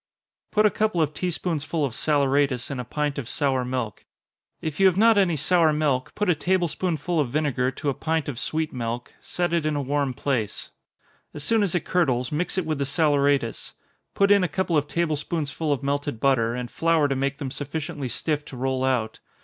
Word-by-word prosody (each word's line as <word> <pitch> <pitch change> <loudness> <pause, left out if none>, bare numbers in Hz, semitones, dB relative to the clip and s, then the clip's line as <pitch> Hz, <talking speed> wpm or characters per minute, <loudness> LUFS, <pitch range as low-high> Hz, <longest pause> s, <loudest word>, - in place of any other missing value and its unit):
_ - - -51
Put 215 0 +3
a 210 - +5
couple 215 -5 0
of 155 -2 +1
tea 180 +4 -2
spoonsful 165 -2 -1
of 130 - -4
saleratus 140 -2 +1
in 135 - -4
a - - -2
pint 145 +3 -2
of 120 - -6
sour 135 -3 +1
milk. 125 -5 -3 0.6
If 155 +1 -5
you 195 - +7
have 185 -1 +2
not 225 +2 +6
any 190 -5 +3
sour 160 +2 +3
milk, 145 -4 0
put 210 - 0
a 180 - +5
table 175 +2 +1
spoonful 170 0 -1
of 140 -5 +1
vinegar 135 -3 0
to 140 +3 -3
a - - +1
pint 160 +2 -1
of 135 -5 -4
sweet 160 0 -2
milk, 120 0 -4
set 175 -1 -2
it 170 -2 +2
in 155 -1 0
a 145 - 0
warm 140 -1 -1
place 120 -7 -2 0.6
as 150 - -5
soon 225 +7 +2
as 195 -4 +1
it 170 - -1
curdles, 130 -9 +1
mix 170 +5 -1
it 185 - 0
with 155 -2 -2
the 140 - 0
saleratus 145 -5 +1 0.4
put 200 0 +3
in 200 -2 +6
a - - +2
couple 185 -1 -1
of 150 -1 +2
table 165 0 0
spoonfuls 150 0 -2
of 140 - -16
melted 145 -3 -2
butter, 120 -3 +2
and 125 -1 -5
flour 165 -3 +2
to 135 - -1
make 140 +1 -1
them 140 -3 -5
sufficiently 145 0 -4
stiff 150 +4 -1
to 130 - -9
roll 130 +1 -1
out. 125 -4 0
145 Hz, 215 wpm, -25 LUFS, 135-165 Hz, 0.6 s, you